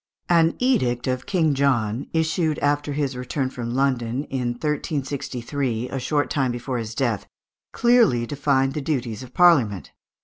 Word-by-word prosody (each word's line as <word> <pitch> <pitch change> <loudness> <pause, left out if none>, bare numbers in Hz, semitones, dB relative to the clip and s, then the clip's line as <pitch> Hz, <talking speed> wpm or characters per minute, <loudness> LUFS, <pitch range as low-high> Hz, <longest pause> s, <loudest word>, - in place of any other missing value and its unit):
An 165 -1 +4
edict 125 - +1
of 130 -1 -2
King 165 -6 +2
John, 130 -4 0
issued 160 -1 0
after 145 0 0
his 140 -2 -1
return 130 +1 -3
from 120 -1 -4
London 130 -1 0
in 125 -2 -1
1363, 135 -3 -3
a 135 - -3
short 145 +3 0
time 135 -4 +1
before 120 +1 -3
his 115 0 -6
death, 115 -6 -1 0.4
clearly 230 - +3
defined 135 0 +1
the 150 - -3
duties 125 -7 -2
of 130 -1 -12
Parliament. 130 - +4
135 Hz, 145 wpm, -23 LUFS, 120-150 Hz, 0.4 s, An